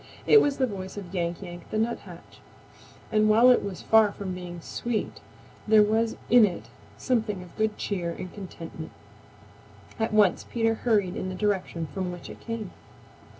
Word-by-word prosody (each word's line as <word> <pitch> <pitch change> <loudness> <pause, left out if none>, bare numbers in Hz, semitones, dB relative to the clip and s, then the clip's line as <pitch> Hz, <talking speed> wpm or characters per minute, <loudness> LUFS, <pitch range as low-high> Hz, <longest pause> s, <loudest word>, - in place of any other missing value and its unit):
It 435 - +7
was 285 -1 +1
the 260 - +3
voice 195 -4 -6
of 190 -3 -8
Yank 175 0 -2
Yank 175 -1 -10
the - - -2
Nuthatch, 230 +2 -4 0.7
and 215 0 +3
while 235 +4 +7
it 250 - +3
was 195 -3 -6
far 220 -2 +5
from 195 -2 -5
being 175 -1 -7
sweet 225 +6 -4 0.5
there 215 0 +7
was 220 +2 +1
in 240 -1 +7
it 175 - -1 0.3
something 220 -7 -1
of 180 - -15
good 215 -1 0
cheer 180 -4 -2
and 180 +1 -7
contentment. 165 -5 -9 1.1
At 225 - 0
once 210 -4 +4
Peter 225 -1 0
hurried 210 -6 +1
in 185 - -3
the 185 - -5
direction 185 -4 -1
from 180 +5 -4
which 175 -1 -9
it - - -12
came. 230 -4 -5
205 Hz, 170 wpm, -27 LUFS, 180-220 Hz, 1.1 s, It